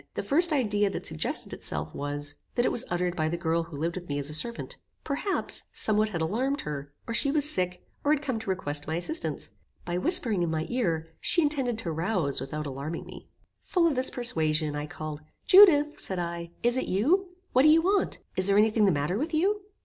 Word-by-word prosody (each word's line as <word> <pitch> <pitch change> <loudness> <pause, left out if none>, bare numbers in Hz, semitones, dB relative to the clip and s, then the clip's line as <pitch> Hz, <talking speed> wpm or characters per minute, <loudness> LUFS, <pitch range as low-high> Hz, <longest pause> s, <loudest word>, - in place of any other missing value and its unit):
The - - -2
first 340 +4 +5
idea 210 -8 +2
that - - -5
suggested 75 - -1
itself - - -5
was, 145 0 -3 0.2
that 240 - +2
it - - +2
was 240 - +1
uttered 175 0 -1
by 155 -3 0
the 170 - -2
girl 170 -1 0
who 165 -3 -8
lived 165 +3 -2
with 175 -3 -7
me 145 - -1
as 145 +1 -4
a - - -5
servant. 235 +10 -3 0.3
Perhaps, 310 +7 -1
somewhat 215 0 +2
had 170 -6 -3
alarmed 255 - -1
her, 145 -1 -6
or 230 - -4
she 280 - +3
was 295 0 +2
sick, 180 -9 -1 0.2
and 290 - +4
had 295 - -7
come 260 -6 -2
to 220 - -7
request 145 -6 -2
my 160 - -1
assistance. 315 - -3 0.3
By 175 0 -2
whispering 235 - +2
in 170 - 0
my 160 0 -1
ear, 165 -10 -1
she 340 - +2
intended 270 -6 0
to 190 -7 -3
rouse 165 - 0
without 150 +3 -4
alarming 140 +4 -5
me. - - -12 0.3
Full 355 -3 +1
of 330 - +3
this 255 +1 +1
persuasion, 155 -10 0
I 145 +1 -4
called; 155 -2 -7 0.2
"Judith," 325 -7 +7
said 190 - -3
I, 170 -1 -4
"is 240 +1 +3
it - - -1
you? 330 - +2 0.2
What 255 - +5
do 305 - +6
you 325 +1 +5
want? 390 +2 +1 0.2
Is 185 0 +2
there 200 0 +3
any 215 +1 +5
thing 215 -1 +3
the 195 - +4
matter 150 +6 -1
with 315 +3 -2
you?" 400 +6 +1
195 Hz, 220 wpm, -27 LUFS, -, 0.3 s, Judith